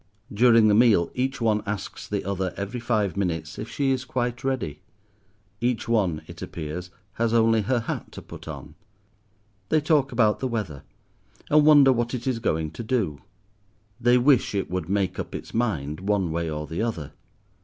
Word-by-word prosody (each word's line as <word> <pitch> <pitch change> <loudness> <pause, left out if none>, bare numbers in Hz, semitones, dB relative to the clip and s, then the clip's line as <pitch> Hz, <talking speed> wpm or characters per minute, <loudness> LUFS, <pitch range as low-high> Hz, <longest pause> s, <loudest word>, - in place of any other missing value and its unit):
During 115 0 +5
the 105 - +4
meal 105 -6 +4
each 130 +1 -1
one 110 -3 +2
asks 100 -1 -5
the - - -3
other, 95 -2 -2
every 100 +5 -4
five 110 -6 0
minutes, 85 -5 -2
if 110 - -5
she 135 +1 0
is 130 -1 0
quite 120 -1 -3
ready. 130 - -2 0.8
Each 120 -1 -1
one, 100 -9 +1
it - - -11
appears, 85 +3 -6 0.2
has 115 +1 0
only 115 -1 +4
her 120 +3 0
hat 115 - -5
to - - -8
put - - -11
on. - - -8 1.0
They 155 - +4
talk 145 -3 +2
about 110 -3 +2
the 130 - -1
weather, 105 - -4 0.7
and 150 0 +5
wonder 145 -3 +7
what 120 +1 -1
it 120 - -6
is 130 -3 0
going 80 -7 -1
to 80 - -7
do. 110 - -1 0.8
They 120 +1 +4
wish 125 -4 +3
it 95 -3 -2
would 90 -3 -3
make 95 -2 0
up - - -5
its - - -8
mind, 80 - -1
one 95 -3 0
way 85 0 -2
or 75 0 -4
the 80 +6 -4
other. 85 -11 -3
110 Hz, 180 wpm, -25 LUFS, 90-125 Hz, 1.0 s, wonder